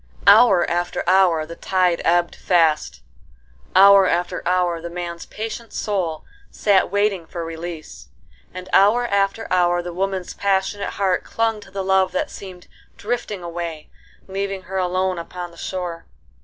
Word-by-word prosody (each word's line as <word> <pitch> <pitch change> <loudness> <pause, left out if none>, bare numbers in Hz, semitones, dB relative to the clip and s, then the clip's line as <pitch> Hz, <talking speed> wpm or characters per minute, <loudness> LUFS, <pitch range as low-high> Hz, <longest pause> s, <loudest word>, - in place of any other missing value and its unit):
Hour 200 -3 +6
after 175 +1 -2
hour 180 -4 +4
the 170 +2 -9
tide 180 -2 +1
ebbed 175 0 +2
fast, 165 - +1 0.7
hour 195 0 +7
after 175 +1 -1
hour 180 -2 +1
the 170 - -6
man's 170 -1 -6
patient 225 +1 -6
soul 180 -7 -2 0.2
sat 200 -2 +2
waiting 200 -4 0
for 170 -1 -6
release, 165 - -8 0.4
and 185 0 -8
hour 215 +5 +5
after 200 0 0
hour 175 -1 +2
the 175 0 -6
woman's 190 0 -3
passionate 200 +1 -1
heart 190 -2 0
clung 225 -1 -1
to 200 - -14
the 195 0 -4
love 190 0 +2
that 290 +2 -2
seemed 185 -3 -10 0.3
drifting 210 -4 -4
away 170 -2 -6 0.4
leaving 195 0 -4
her 190 +1 -5
alone 185 0 0
upon 175 +1 -7
the - - -17
shore. 175 -3 -5
185 Hz, 145 wpm, -21 LUFS, 175-195 Hz, 0.7 s, hour